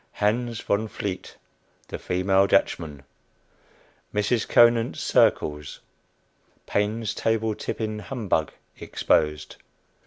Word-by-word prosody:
HANS 115 Hz, +2 st, 0 dB
VON 105 Hz, +2 st, 0 dB
VLEET, 100 Hz, -3 st, -6 dB, 0.5 s
THE -, -, -5 dB
FEMALE 95 Hz, +2 st, +2 dB
DUTCHMAN. 75 Hz, -7 st, 0 dB, 1.1 s
MRS. 105 Hz, +2 st, 0 dB
CONANT'S 120 Hz, -1 st, +4 dB
"CIRCLES." 75 Hz, -2 st, +1 dB, 0.9 s
PAINE'S 105 Hz, +2 st, -1 dB
TABLE 110 Hz, -1 st, 0 dB
TIPPING 110 Hz, 0 st, -4 dB
HUMBUG 105 Hz, -, -1 dB, 0.3 s
EXPOSED. 75 Hz, 0 st, 0 dB
105 Hz, 85 wpm, -25 LUFS, 90-115 Hz, 1.1 s, CONANT'S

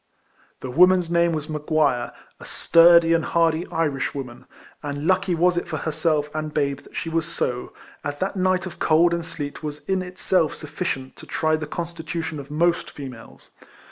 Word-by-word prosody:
The 130 Hz, -, -5 dB
woman's 180 Hz, +3 st, +5 dB
name 170 Hz, 0 st, +3 dB
was 155 Hz, -2 st, -2 dB
M'Guire, 150 Hz, -4 st, 0 dB, 0.3 s
a -, -, -11 dB
sturdy 170 Hz, 0 st, +5 dB
and 165 Hz, -1 st, +2 dB
hardy 165 Hz, +1 st, +1 dB
Irishwoman; 140 Hz, -5 st, -3 dB, 0.3 s
and 145 Hz, 0 st, -4 dB
lucky 185 Hz, 0 st, +2 dB
was 175 Hz, +1 st, +3 dB
it 175 Hz, -, -2 dB
for 160 Hz, -2 st, -3 dB
herself 155 Hz, -1 st, 0 dB
and 155 Hz, 0 st, -3 dB
babe 140 Hz, -2 st, 0 dB
that -, -, -18 dB
she -, -, -3 dB
was 165 Hz, -1 st, -1 dB
so. 125 Hz, 0 st, -3 dB, 0.3 s
as 145 Hz, 0 st, -4 dB
that 190 Hz, +4 st, -2 dB
night 185 Hz, 0 st, +1 dB
of 185 Hz, -, -8 dB
cold 170 Hz, +2 st, +4 dB
and 170 Hz, 0 st, -1 dB
sleet 160 Hz, -3 st, -6 dB
was 150 Hz, -1 st, -7 dB
in 190 Hz, -1 st, +1 dB
itself 180 Hz, -2 st, 0 dB
sufficient 145 Hz, -4 st, -4 dB
to -, -, -12 dB
try 155 Hz, -1 st, +1 dB
the 155 Hz, -1 st, -4 dB
constitution 165 Hz, -1 st, -4 dB
of 140 Hz, 0 st, -9 dB
most 170 Hz, +3 st, +1 dB
females. 130 Hz, -5 st, -11 dB
160 Hz, 170 wpm, -23 LUFS, 150-170 Hz, 0.3 s, woman's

